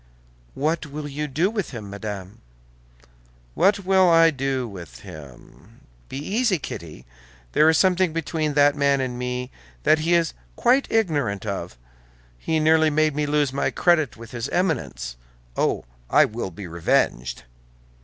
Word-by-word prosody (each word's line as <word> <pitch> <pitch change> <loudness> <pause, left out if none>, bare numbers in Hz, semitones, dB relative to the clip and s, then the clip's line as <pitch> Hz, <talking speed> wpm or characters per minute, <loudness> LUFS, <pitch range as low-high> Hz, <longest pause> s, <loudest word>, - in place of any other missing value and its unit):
"What 155 +3 -1
will 145 +1 -6
you 150 +1 -4
do 165 +8 0
with 210 -5 -3
him, 110 -6 -7
madame?" 100 -2 -7 1.1
"What 195 0 +2
will 190 -1 +5
I 165 -1 +6
do 135 -3 -2
with 85 - -10
him? 70 -5 -13 0.3
Be - - -5
easy, 200 - +1
Kitty, 80 - -8 0.5
there 155 - +5
is 160 - +4
something 185 -1 +3
between 155 -2 -2
that 145 0 +5
man 140 -1 +2
and 125 -2 -3
me 125 +1 -3 0.3
that 155 - +4
he 165 +3 +2
is 170 -1 +1 0.2
quite 255 +3 +2
ignorant 145 - 0
of: 90 - -4 0.6
he 160 - 0
nearly 160 0 +4
made 155 0 +2
me 150 0 0
lose 145 -2 +1
my 140 - 0
credit 160 -7 +2
with 115 +1 -11
his 120 -2 -4
Eminence. 155 - -2 0.4
Oh, - - 0 0.2
I - - +6
will 110 -2 -4
be 95 +3 -9
revenged!" 65 -8 0
145 Hz, 150 wpm, -23 LUFS, 110-165 Hz, 1.1 s, I